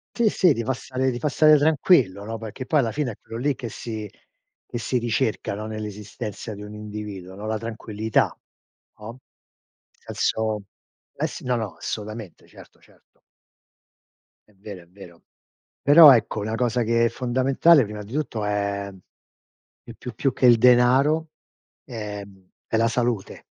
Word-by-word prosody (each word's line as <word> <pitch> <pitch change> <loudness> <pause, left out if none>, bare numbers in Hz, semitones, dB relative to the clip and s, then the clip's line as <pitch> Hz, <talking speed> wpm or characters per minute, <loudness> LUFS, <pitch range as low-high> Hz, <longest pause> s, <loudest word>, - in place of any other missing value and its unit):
Sì, 235 -2 +2
sì, 180 -5 +3
ti 115 - -3
fa 130 - 0
stare 130 +1 -2
ti 120 -1 -3
fa 150 - 0
stare 155 +2 +5
tranquillo, 140 - +3
no, 115 +1 -5
perché 110 +4 -7
poi 155 - +2
alla 115 -5 0
fine 130 +2 -2
è - - -10
quello 115 0 -9
lì 140 +3 0
che 120 - -6
si 110 -1 -6 0.6
che - - -5
si 125 +2 -1
ricerca, 115 -3 -1
no, 105 +1 -6
nell'esistenza 105 0 -6
di 105 0 -9
un 105 0 -9
individuo, 105 -3 -8
no, 105 +2 -8
la 110 0 -1
tranquillità, 110 -1 -2 0.6
no, 115 +4 -9 0.7
senso 110 -2 -2 0.5
eh - - -1
s - - -9
no, 125 0 -1
no, 105 -8 -5
assolutamente, 110 -3 -7
certo, - - -17
certo. - - -27 1.3
È - - -25
vero, 100 -2 -9
è - - -24
vero. 90 -2 -15 0.6
Però 150 +1 +9
ecco, 115 -2 -1
una 110 +2 -3
cosa 120 +1 0
che 115 +1 +2
è - - +3
fondamentale, 130 +5 +3
prima 105 0 -7
di 105 +2 -12
tutto 135 -7 -3
è, 100 -1 -2 0.9
più 115 - -11
più 125 +1 -9
più 135 - 0
che 125 - +2
il 120 -1 +7
denaro, 130 +6 +4 0.6
ehm, 105 -5 -8 0.2
è 110 - 0
la 115 +1 +3
salute. 115 -3 -2
115 Hz, 165 wpm, -23 LUFS, 105-125 Hz, 1.3 s, Però